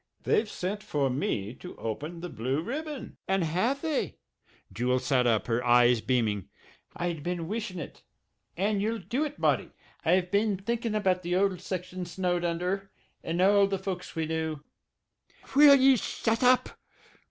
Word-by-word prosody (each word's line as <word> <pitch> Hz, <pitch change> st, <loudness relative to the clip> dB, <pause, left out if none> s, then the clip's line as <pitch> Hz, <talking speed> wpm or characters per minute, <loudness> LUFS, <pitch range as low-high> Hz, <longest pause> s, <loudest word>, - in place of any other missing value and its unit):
"They've 215 Hz, 0 st, +2 dB
sent 205 Hz, +3 st, -3 dB
for 140 Hz, -9 st, 0 dB
me 110 Hz, -5 st, -2 dB
to 180 Hz, -, -9 dB
open 150 Hz, +10 st, -5 dB
the 180 Hz, -, -5 dB
Blue 130 Hz, +5 st, -2 dB
Ribbon." 295 Hz, -, -5 dB
"And 190 Hz, -1 st, +1 dB
have 205 Hz, -, 0 dB
they?" 315 Hz, -3 st, -1 dB, 0.6 s
Jewel 125 Hz, +3 st, +1 dB
sat 130 Hz, -1 st, +2 dB
up, 110 Hz, -3 st, +2 dB
her 115 Hz, 0 st, 0 dB
eyes 120 Hz, -1 st, +5 dB
beaming. 110 Hz, -7 st, 0 dB, 0.5 s
"I'd 170 Hz, -3 st, -3 dB
been 175 Hz, 0 st, -3 dB
wishin' 210 Hz, -2 st, -4 dB
it 165 Hz, -, -8 dB, 0.6 s
and 200 Hz, +2 st, +1 dB
ye'll 225 Hz, +2 st, 0 dB
do 240 Hz, +8 st, -2 dB
it, 295 Hz, 0 st, -6 dB
Marty; -, -, +1 dB, 0.3 s
I've 180 Hz, +2 st, +2 dB
been 205 Hz, 0 st, +2 dB
thinkin' 230 Hz, +2 st, -2 dB
about 190 Hz, -3 st, +1 dB
the 175 Hz, 0 st, -1 dB
old 190 Hz, -1 st, +1 dB
section 180 Hz, -1 st, -5 dB
snowed 175 Hz, 0 st, -1 dB
under 180 Hz, +3 st, -2 dB, 0.3 s
and 165 Hz, +1 st, -2 dB
all 200 Hz, +1 st, +5 dB
the 195 Hz, 0 st, -1 dB
folks 185 Hz, -1 st, -5 dB
we 160 Hz, -1 st, -1 dB
knew 160 Hz, -2 st, -3 dB, 0.5 s
" -, -, -21 dB
"Will 285 Hz, 0 st, +9 dB
ye 265 Hz, 0 st, +6 dB
shut 225 Hz, +1 st, -1 dB
up?" 250 Hz, 0 st, +4 dB
180 Hz, 165 wpm, -28 LUFS, 155-210 Hz, 0.6 s, Will